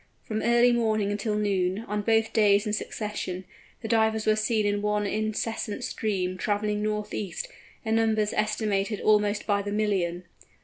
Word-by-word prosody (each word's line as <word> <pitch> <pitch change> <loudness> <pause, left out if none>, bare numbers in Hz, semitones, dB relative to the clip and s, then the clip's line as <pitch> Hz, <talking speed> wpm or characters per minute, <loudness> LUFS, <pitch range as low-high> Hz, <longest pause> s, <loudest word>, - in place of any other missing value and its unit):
From 215 0 -3
early 240 +1 +4
morning 215 -4 +1
until 210 +1 -1
noon, 195 -2 0
on 210 +1 -1
both 225 +1 +2
days 205 -1 +4
in 210 - -2
succession, 210 -4 -4 0.4
the - - -3
Divers 220 -1 +2
were 215 - +4
seen 215 0 +1
in 205 0 0
one 210 0 0
incessant 215 +1 -2
stream, 185 -4 -2
travelling 210 +1 0
north 210 0 -2
east, 205 - -4 0.4
in 220 0 +2
numbers 220 -2 +1
estimated 210 -1 0
almost 210 -1 +2
by 200 -1 +1
the 205 0 -4
million! 190 -5 0
210 Hz, 160 wpm, -27 LUFS, 205-220 Hz, 0.4 s, early